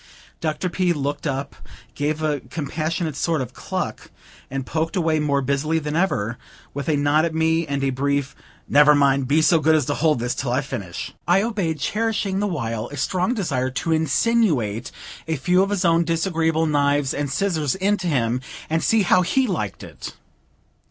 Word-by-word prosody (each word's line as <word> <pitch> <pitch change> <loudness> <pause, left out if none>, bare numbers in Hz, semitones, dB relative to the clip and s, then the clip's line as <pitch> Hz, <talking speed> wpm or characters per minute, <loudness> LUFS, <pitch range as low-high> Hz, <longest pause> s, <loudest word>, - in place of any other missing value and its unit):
Dr. 155 +2 -2
P. 180 0 +1
looked 145 +1 -3
up, 140 0 -3 0.4
gave 155 +2 -2
a 150 -2 0
compassionate 155 +4 -3
sort 160 +2 0
of 130 -3 -5
cluck, - - -4 0.4
and 135 0 -4
poked 160 +5 -2
away 160 -4 +1
more 140 -2 +1
busily 140 +4 0
than 150 -1 -3
ever, 140 - 0 0.3
with 140 0 -4
a 150 - +2
nod 145 +2 +3
at 165 -1 -1
me 160 0 +1
and 140 -1 -2
a 135 - +1
brief 140 +1 -1 0.3
"Never 150 +1 +6
mind; 140 -2 +3
be 155 +4 +3
so 165 +1 +5
good 155 +1 +4
as 150 -4 +2
to 145 - -1
hold 155 -1 +2
this 120 +1 -1
till 130 -2 -3
I 130 +3 +1
finish." 110 -11 -6
I 185 +3 +4
obeyed, 200 -9 -1
cherishing 210 0 -1
the 205 - 0
while 115 - -3
a 145 - -9
strong 185 - 0
desire 140 - -1
to 140 +5 -3
insinuate 155 - +1 0.4
a 160 - 0
few 180 +6 +2
of 195 - +1
his 200 -2 0
own 170 0 +4
disagreeable 165 -1 +1
knives 145 -2 +1
and 145 -1 -2
scissors 155 -5 0
into 190 -1 0
him, 125 -5 0 0.3
and 165 0 +1
see 225 -2 +3
how 180 0 +4
he 255 +9 +2
liked 160 - -3
it. - - -9
155 Hz, 185 wpm, -22 LUFS, 140-170 Hz, 0.4 s, Never